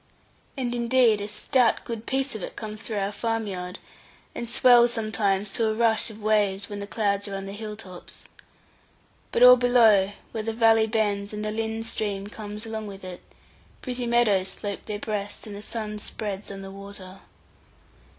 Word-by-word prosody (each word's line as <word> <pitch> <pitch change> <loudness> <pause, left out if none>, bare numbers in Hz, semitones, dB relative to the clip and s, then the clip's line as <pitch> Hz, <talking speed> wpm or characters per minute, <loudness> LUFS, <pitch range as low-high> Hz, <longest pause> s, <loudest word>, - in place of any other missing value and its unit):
And 245 -2 -1
indeed 235 -3 +3
a 205 - -3
stout 230 +3 +2
good 230 -1 -6
piece 270 +1 0
of 220 - -6
it - - -6
comes 215 -1 -6
through 225 -2 -4
our 200 0 -1
farm 225 +1 -1
yard, 180 -2 -5 0.6
and 235 - -5
swells 240 -1 +6
sometimes 210 -3 0
to 225 +1 +1
a 215 - 0
rush 225 -1 +2
of 220 -1 -11
waves, 205 -2 +2
when 205 - -5
the 200 - -5
clouds 200 -1 0
are 200 - -5
on 195 0 -5
the 195 - -6
hill 210 +1 -6
tops. 185 -4 -12 1.1
But 240 - +3
all 250 0 +10
below, 225 -6 +5 0.2
where 220 - -3
the 225 +1 -2
valley 225 -1 +4
bends, 205 -2 0
and 210 0 -4
the 215 - -1
Lynn 225 +1 -2
stream 205 -3 -3
comes 210 +1 -7
along 220 -1 -5
with 195 -1 -9
it, 180 -1 -8 0.6
pretty 250 -2 -3
meadows 220 -6 +3
slope 200 +1 -5
their 210 - -3
breast, 205 -1 -4
and 210 -2 -8
the 200 - -8
sun 215 -1 -5
spreads 205 -1 -5
on 195 -1 -7
the 195 - -8
water. 195 -1 -10
215 Hz, 185 wpm, -25 LUFS, 200-225 Hz, 1.1 s, all